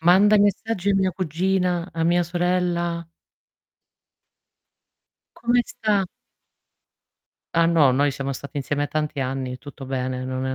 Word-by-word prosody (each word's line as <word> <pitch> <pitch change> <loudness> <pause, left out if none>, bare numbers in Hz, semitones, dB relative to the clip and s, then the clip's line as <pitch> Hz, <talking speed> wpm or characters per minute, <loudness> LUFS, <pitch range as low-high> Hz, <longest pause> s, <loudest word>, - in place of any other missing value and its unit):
Manda 190 +5 +6
i - - +4
messaggi 205 -1 +1
a - - +3
mia 190 -1 +2
cugina, 180 +1 -1
a 165 0 -2
mia 175 +1 +3
sorella. 175 -1 -1 2.3
"Come 240 +1 +3
sta?" 205 -3 0 1.5
Ah 165 0 +4
no, 160 -5 +5
noi 140 +2 +2
siamo 140 0 -3
stati 140 +2 -6
insieme 145 +1 -1
a - - -2
tanti 150 -1 -3
anni, 130 -1 -3
tutto 145 -1 -10
bene, 130 -1 -3
non 130 0 -3
è 130 - -2
170 Hz, 135 wpm, -23 LUFS, 140-185 Hz, 2.3 s, Manda